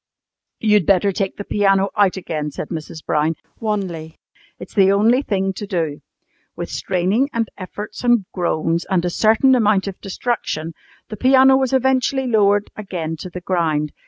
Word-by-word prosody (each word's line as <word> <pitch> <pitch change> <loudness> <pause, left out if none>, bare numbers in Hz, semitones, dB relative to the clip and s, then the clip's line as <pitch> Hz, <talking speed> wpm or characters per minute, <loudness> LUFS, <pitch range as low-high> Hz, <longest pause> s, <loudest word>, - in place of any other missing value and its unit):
"You'd 210 -5 +3
better 195 +1 +3
take 195 0 -2
out - - -41
the 205 - -5
piano 195 -1 +2
again," 180 -7 0
said 150 - -7
Mrs. 160 -1 -7
Brown 155 +2 +1 0.2
wanly. 185 -7 -3 0.4
"It's - - -11
the 195 -2 +4
only 225 +6 +3
thing 195 -6 -1
to 205 +2 -7
do." 160 -6 -2 0.5
With - - -6
straining, 195 +9 0
and 230 -1 0
efforts, 205 +4 -8
and 240 -5 +3
groans, 170 -2 0
and 180 -3 +1
a 175 - -1
certain 225 +7 +4
amount 210 -5 +3
of 195 - -7
destruction, 185 -6 -3 0.4
the 215 - -7
piano 265 +2 +5
was 265 -1 +1
eventually 265 0 +1
lowered 205 -3 +2
again 175 -6 -4
to 180 - -8
the 180 +1 -8
ground. 160 -5 0
195 Hz, 160 wpm, -20 LUFS, 170-220 Hz, 0.5 s, piano